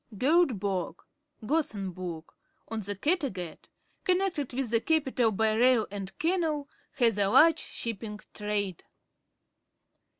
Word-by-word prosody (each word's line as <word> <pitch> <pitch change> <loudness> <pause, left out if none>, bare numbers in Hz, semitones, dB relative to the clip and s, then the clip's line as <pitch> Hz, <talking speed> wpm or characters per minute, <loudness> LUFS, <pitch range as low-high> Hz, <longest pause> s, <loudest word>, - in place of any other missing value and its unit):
Goteborg 205 - +1 0.5
{Gothenburg}, 185 - -3 0.3
on 225 - -3
the 205 -1 -3
Kattegat, 245 - -2 0.4
connected 365 -7 +1
with 255 -2 -2
the 230 -1 +3
capital 270 -7 +2
by 220 +1 +1
rail 240 0 +4
and 195 -2 -6
canal, 320 -4 0 0.3
has 230 -5 +2
a 200 - +3
large 320 +9 +6
shipping 215 -2 -5
trade. 205 -4 -2
225 Hz, 105 wpm, -29 LUFS, 200-295 Hz, 0.5 s, large